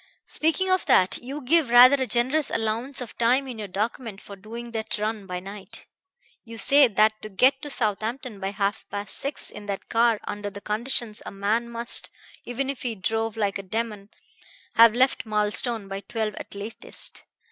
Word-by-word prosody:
Speaking 325 Hz, +5 st, 0 dB
of 370 Hz, -1 st, +1 dB
that, 185 Hz, 0 st, +3 dB
you 275 Hz, +4 st, -6 dB
give 295 Hz, +1 st, +2 dB
rather 250 Hz, +3 st, +8 dB
a 260 Hz, -, 0 dB
generous 255 Hz, +7 st, +1 dB
allowance 230 Hz, +5 st, -1 dB
of 245 Hz, -, -7 dB
time 250 Hz, +4 st, +3 dB
in 245 Hz, -4 st, -7 dB
your 210 Hz, -, -5 dB
document 215 Hz, +2 st, -4 dB
for 200 Hz, -, -11 dB
doing 230 Hz, +4 st, -9 dB
that 220 Hz, 0 st, -3 dB
run 210 Hz, -1 st, -3 dB
by 180 Hz, -1 st, -4 dB
night. 200 Hz, +4 st, -10 dB, 0.6 s
You 230 Hz, -1 st, -10 dB
say 280 Hz, +4 st, +6 dB
that 215 Hz, 0 st, +2 dB
to 215 Hz, -, -8 dB
get 260 Hz, +7 st, +3 dB
to 295 Hz, -, -6 dB
Southampton 220 Hz, -1 st, -2 dB
by 195 Hz, 0 st, -2 dB
half 200 Hz, +1 st, -2 dB
past 205 Hz, -1 st, -2 dB
six 280 Hz, +2 st, +1 dB
in 210 Hz, 0 st, -10 dB
that 200 Hz, -1 st, -5 dB
car 230 Hz, -1 st, +3 dB
under 205 Hz, 0 st, -5 dB
the 200 Hz, 0 st, -9 dB
conditions, 220 Hz, +1 st, 0 dB
a -, -, -7 dB
man 215 Hz, +4 st, -1 dB
must, 235 Hz, 0 st, +3 dB, 0.4 s
even 250 Hz, +3 st, -3 dB
if 275 Hz, -1 st, -4 dB
he 240 Hz, -3 st, -3 dB
drove 225 Hz, +2 st, -2 dB
like 200 Hz, -2 st, -1 dB
a -, -, -4 dB
demon, 210 Hz, 0 st, -4 dB, 0.6 s
have 230 Hz, -1 st, +7 dB
left 255 Hz, -2 st, +2 dB
Marlstone 210 Hz, +1 st, 0 dB
by 195 Hz, 0 st, -5 dB
twelve 220 Hz, 0 st, -3 dB
at -, -, -8 dB
latest. 205 Hz, +3 st, -6 dB
225 Hz, 185 wpm, -25 LUFS, 205-245 Hz, 0.6 s, rather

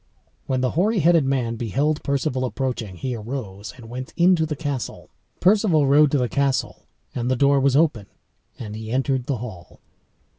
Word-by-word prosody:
When 130 Hz, -1 st, 0 dB
the 125 Hz, -, +1 dB
hoary 210 Hz, +6 st, +1 dB
headed 165 Hz, -2 st, +4 dB
man 125 Hz, -4 st, -1 dB
beheld 140 Hz, +7 st, 0 dB
Perceval 140 Hz, -2 st, -1 dB
approaching, 125 Hz, -6 st, -3 dB
he 125 Hz, +9 st, -4 dB
arose 105 Hz, -4 st, -6 dB
and 115 Hz, -3 st, -12 dB
went 125 Hz, +2 st, -7 dB
into 175 Hz, -2 st, +4 dB
the 150 Hz, -, -3 dB
castle. 140 Hz, -4 st, -5 dB, 0.3 s
Perceval 185 Hz, -6 st, +3 dB
rode 145 Hz, +2 st, +5 dB
to 145 Hz, -, +1 dB
the 125 Hz, -2 st, +1 dB
castle, 140 Hz, +1 st, -1 dB, 0.3 s
and 120 Hz, 0 st, -2 dB
the 130 Hz, -, +2 dB
door 140 Hz, +2 st, +3 dB
was 135 Hz, -1 st, +2 dB
open, 140 Hz, -10 st, +2 dB, 0.5 s
and 105 Hz, -2 st, -7 dB
he 110 Hz, 0 st, -7 dB
entered 130 Hz, 0 st, 0 dB
the 140 Hz, -, -1 dB
hall. 100 Hz, -7 st, -9 dB
135 Hz, 175 wpm, -23 LUFS, 120-150 Hz, 0.5 s, rode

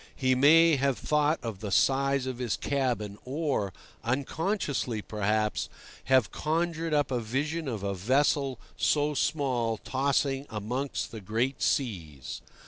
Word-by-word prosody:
He 130 Hz, -1 st, +2 dB
may 155 Hz, +4 st, +6 dB
have 135 Hz, -1 st, +1 dB
thought 150 Hz, +1 st, +2 dB
of 110 Hz, -5 st, -4 dB
the 105 Hz, -, -4 dB
size 135 Hz, +4 st, +2 dB
of 130 Hz, -2 st, -4 dB
his 120 Hz, -6 st, -1 dB
cabin, 120 Hz, -8 st, -1 dB
or—unconsciously, 135 Hz, -, -2 dB
perhaps—have 110 Hz, +4 st, 0 dB
conjured 165 Hz, +1 st, -1 dB
up 145 Hz, -2 st, +2 dB
a 125 Hz, -, +1 dB
vision 145 Hz, +8 st, -2 dB
of 110 Hz, -6 st, -3 dB
a 100 Hz, 0 st, -1 dB
vessel 135 Hz, +6 st, +1 dB, 0.2 s
so 150 Hz, 0 st, +2 dB
small 130 Hz, -6 st, 0 dB
tossing 135 Hz, +2 st, 0 dB
amongst 120 Hz, +6 st, -3 dB
the 110 Hz, -, -7 dB
great 115 Hz, +7 st, -1 dB
seas. 80 Hz, -, -2 dB
130 Hz, 125 wpm, -29 LUFS, 110-145 Hz, 0.2 s, may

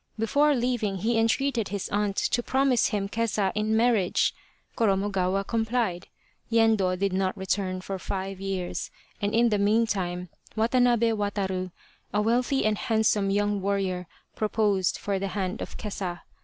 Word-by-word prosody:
Before 285 Hz, +7 st, +3 dB
leaving 235 Hz, -5 st, 0 dB
he 225 Hz, +4 st, +1 dB
entreated 230 Hz, 0 st, +1 dB
his 200 Hz, -1 st, -3 dB
aunt 205 Hz, -1 st, 0 dB
to 240 Hz, -, +1 dB
promise 265 Hz, -1 st, +2 dB
him 200 Hz, -2 st, -1 dB
Kesa 210 Hz, -3 st, 0 dB
in 215 Hz, +1 st, +1 dB
marriage. 225 Hz, -6 st, +2 dB, 0.4 s
Koromogawa 195 Hz, -2 st, +1 dB
complied. 225 Hz, -5 st, -1 dB, 0.4 s
Yendo 220 Hz, -5 st, +3 dB
did 195 Hz, 0 st, 0 dB
not 190 Hz, +1 st, 0 dB
return 190 Hz, -1 st, -1 dB
for 190 Hz, 0 st, -5 dB
five 195 Hz, 0 st, -4 dB
years, 190 Hz, -2 st, -3 dB, 0.3 s
and 205 Hz, +1 st, 0 dB
in 235 Hz, +1 st, +4 dB
the 210 Hz, -2 st, +1 dB
meantime, 200 Hz, -4 st, +1 dB, 0.3 s
Watanabe 235 Hz, 0 st, +3 dB
Wataru, 195 Hz, -3 st, -2 dB, 0.4 s
a 205 Hz, -, +1 dB
wealthy 245 Hz, +5 st, +1 dB
and 215 Hz, -1 st, +1 dB
handsome 220 Hz, -3 st, +2 dB
young 205 Hz, 0 st, +1 dB
warrior, 190 Hz, -2 st, -1 dB, 0.3 s
proposed 210 Hz, -4 st, +1 dB
for 200 Hz, -1 st, -2 dB
the 195 Hz, -, -2 dB
hand 190 Hz, +1 st, -2 dB
of -, -, -6 dB
Kesa. 190 Hz, -5 st, -4 dB
205 Hz, 140 wpm, -27 LUFS, 190-225 Hz, 0.4 s, in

